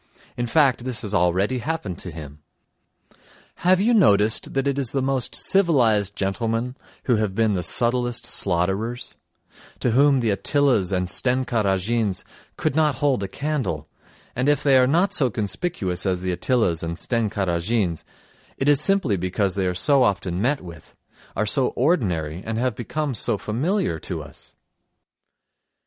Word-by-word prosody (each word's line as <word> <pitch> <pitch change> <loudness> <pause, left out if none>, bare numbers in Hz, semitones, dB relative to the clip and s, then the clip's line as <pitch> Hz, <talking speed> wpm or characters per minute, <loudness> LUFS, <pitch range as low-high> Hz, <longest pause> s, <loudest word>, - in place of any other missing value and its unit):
In 120 0 -2
fact, 135 -2 +2
this 125 -2 -4
has 105 -1 -4
already 95 +7 +1
happened 130 - -4
to 90 - -7
him. 75 -3 -10 1.2
Have 185 +1 +3
you 225 +5 +3
noticed 110 - +3
that 135 +1 0
it 140 0 0
is 130 -5 -2
the 135 - 0
most 135 -2 -1
civilised 120 - +2
gentlemen 115 +5 -2 0.3
who 125 -4 +2
have 105 -3 -1
been 110 -1 +2
the 90 - -1
subtlest 120 +4 +1
slaughterers, 95 +7 -1 0.7
to 125 - 0
whom 140 +3 +4
the 115 -3 +1
Attilas 120 - +1
and 90 -1 0
Stenka 125 +2 0
Razins 100 +1 0 0.3
could - - -1
not 155 -3 +2
hold 140 -7 +1
a 100 - -2
candle, 105 - -3 0.5
and 130 +4 +1
if 145 -2 +1
they 140 -2 +4
are 125 - +4
not 175 +8 +2
so 130 -4 +2
conspicuous 100 - -3
as 90 -1 -1
the 90 - -1
Attilas 90 -2 0
and 85 0 -4
Stenka 110 -4 -1
Razins 85 0 -1 0.5
it 135 - -1
is 145 -1 +5
simply 150 - +2
because 95 +2 -1
they 95 -2 -1
are 90 - -2
so 140 +8 +3
often 95 -5 0
met 135 +5 0
with, 85 -4 -13 0.4
are 110 - 0
so 125 +5 +2
ordinary 90 - 0
and 110 0 -4
have 125 +1 0
become 140 +6 -3
so 115 -1 0
familiar 130 - -1
to - - -5
us. - - -15
115 Hz, 160 wpm, -23 LUFS, 95-135 Hz, 1.2 s, is